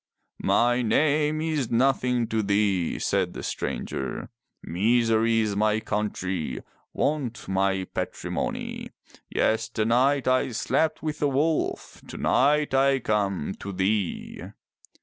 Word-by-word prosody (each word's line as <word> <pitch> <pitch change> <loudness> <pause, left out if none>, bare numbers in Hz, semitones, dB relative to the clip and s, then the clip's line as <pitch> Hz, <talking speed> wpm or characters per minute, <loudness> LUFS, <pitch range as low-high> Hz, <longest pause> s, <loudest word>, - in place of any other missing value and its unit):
"My 120 +1 +3
name 150 +6 +2
is 155 -7 -1
nothing 125 -1 +2
to 110 0 +1
thee," 100 -4 +1
said - - 0
the - - -6
stranger. 65 - -4 0.3
"Misery 115 +4 +2
is 105 -2 -1
my 105 +1 +2
country, 95 - -3 0.3
Want 140 -6 -2
my 95 0 +1
patrimony. - - -4 0.4
Yesternight 115 +5 +1
I 130 -1 +2
slept 160 +7 0
with 155 -1 -3
a 145 - +3
wolf. 150 +4 -1
Tonight 150 +2 +2
I 135 0 +4
come 100 - -1
to 100 - -6
thee!" 95 0 -1
115 Hz, 110 wpm, -26 LUFS, 100-135 Hz, 0.4 s, I